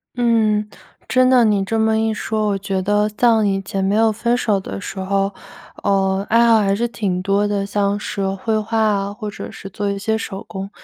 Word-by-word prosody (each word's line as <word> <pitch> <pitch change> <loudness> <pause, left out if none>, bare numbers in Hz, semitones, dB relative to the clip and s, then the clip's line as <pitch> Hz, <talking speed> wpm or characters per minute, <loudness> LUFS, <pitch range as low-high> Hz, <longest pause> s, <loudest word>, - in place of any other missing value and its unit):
嗯。 220 -3 +2 0.4
真 255 0 +4
的 250 -2 +5
你 205 -2 +2
这 225 +3 -2
么 220 0 +2
一 220 0 0
说， 215 0 -2
我 200 -1 +1
觉 195 -1 -2
得 205 +2 +1
像 225 -3 +4
以 195 -1 0
前 195 0 -3
没 200 +2 +1
有 225 0 +3
分 235 +3 0
手 210 -5 +1
的 195 - -6
时 190 - -6
候， 195 +1 -1 0.5
呃， 195 0 +1
爱 235 +1 +4
好 225 -1 +5
还 195 -1 +1
是 235 +4 0
挺 195 -6 -2
多 200 +2 +1
的， 200 -1 -1
像 200 0 0
是 195 -1 -3
绘 215 +3 -2
画 220 +1 -1
啊， 205 -2 +1
或 210 0 -6
者 205 - -7
是 195 - -9
做 205 +1 -2
一 200 - -3
些 220 +2 0
手 195 -3 -6
工， 195 +1 -6
205 Hz, 235 characters per minute, -19 LUFS, 195-220 Hz, 0.5 s, 的